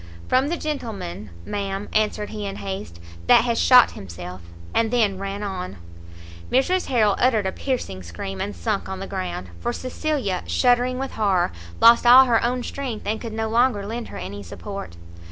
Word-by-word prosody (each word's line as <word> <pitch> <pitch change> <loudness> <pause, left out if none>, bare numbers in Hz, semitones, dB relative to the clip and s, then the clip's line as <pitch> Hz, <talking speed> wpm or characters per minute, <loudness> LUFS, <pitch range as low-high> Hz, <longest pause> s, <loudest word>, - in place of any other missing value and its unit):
"From 260 +2 +3
the 340 +3 -1
gentleman, 215 - -5 0.2
ma'am," 200 0 -3
answered 210 -1 0
he 210 -2 -4
in 195 - -5
haste, 190 - -6 0.3
"that - - +7
has 235 -1 0
shot 250 -1 +7
himself," 90 0 -8 0.3
and 225 -1 +2
then 215 -5 +1
ran 195 +1 -4
on. 185 - -5 0.7
Mrs 360 +9 +2
Harrel 220 -6 +3
uttered 230 -5 +3
a 190 - 0
piercing 215 - -3
scream, 90 +2 -6
and 100 - -3
sunk 85 - -2
on 190 0 -5
the 195 - -5
ground; 185 - -5
for - - -1
Cecilia, 255 - -2
shuddering 250 0 +2
with 270 +1 -3
horror, 195 - +1 0.3
lost 235 +1 +7
all 255 +2 +10
her 235 -3 +2
own 245 +1 0
strength, 255 -6 -5
and 220 +2 -2
could 230 - -5
no 220 0 -1
longer 230 -2 +2
lend 230 +3 -5
her - - -9
any 100 +2 -6
support. 100 - -8
210 Hz, 175 wpm, -23 LUFS, 185-245 Hz, 0.7 s, all